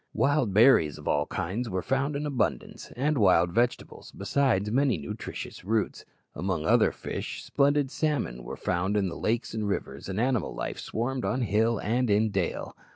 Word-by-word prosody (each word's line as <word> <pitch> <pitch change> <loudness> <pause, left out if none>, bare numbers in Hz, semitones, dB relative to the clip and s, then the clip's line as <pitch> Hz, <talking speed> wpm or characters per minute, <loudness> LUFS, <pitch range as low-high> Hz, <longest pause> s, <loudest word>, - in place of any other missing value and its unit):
Wild 140 -5 +2
berries 100 - +5
of - - -10
all 75 +1 +1
kinds 100 +7 -3
were 95 -2 -2
found 135 +2 0
in 145 +1 -2
abundance, 135 -6 -2
and 145 +2 +1
wild 90 -4 +4
vegetables, 120 +5 -1
besides 105 -1 0
many 135 0 +2
nutritious 105 0 -7
roots. 110 +2 -1 0.3
Among 90 -1 -2
other - - +4
fish, - - -6
splendid 140 -1 +2
salmon 145 - -1
were - - -7
found 95 +3 0
in 95 -2 +1
the 85 - -6
lakes 115 +6 -1
and 110 -2 -2
rivers, 70 -6 -4
and 95 +2 -2
animal 125 0 0
life - - -4
swarmed 125 +3 -3
on 130 - 0
hill 115 +1 +2
and 120 +4 0
in 105 +1 +3
dale. 95 -3 -2
110 Hz, 170 wpm, -27 LUFS, 95-130 Hz, 0.3 s, berries